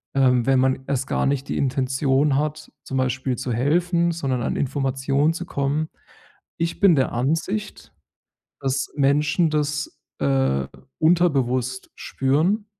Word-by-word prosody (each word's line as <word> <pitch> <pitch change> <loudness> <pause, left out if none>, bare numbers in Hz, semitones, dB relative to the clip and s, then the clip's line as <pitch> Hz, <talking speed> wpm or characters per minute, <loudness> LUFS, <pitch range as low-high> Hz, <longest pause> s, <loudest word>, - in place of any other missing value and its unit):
ähm, 125 -3 +3
wenn 135 -1 +3
man 130 0 +2
erst 135 -1 -1
gar - - 0
nicht 140 0 -1
die - - -2
Intention 135 +1 +1
hat, 150 +1 -3
zum 135 - -4
Beispiel 130 0 -1
zu 130 -1 -3
helfen, 170 +7 +1
sondern 135 -7 -2
an - - -1
Informationen 135 +2 0
zu 175 +2 -5
kommen. 145 +1 -1 0.7
Ich 165 0 -2
bin 185 -5 +6
der 130 - +1
Ansicht, 165 - -2 0.7
dass 135 0 -1
Menschen 145 +4 +2
das, 150 0 -2 0.2
äh, 65 -1 +1 0.3
unterbewusst 130 -7 +1
spüren 160 +11 0
140 Hz, 130 wpm, -23 LUFS, 130-155 Hz, 0.7 s, bin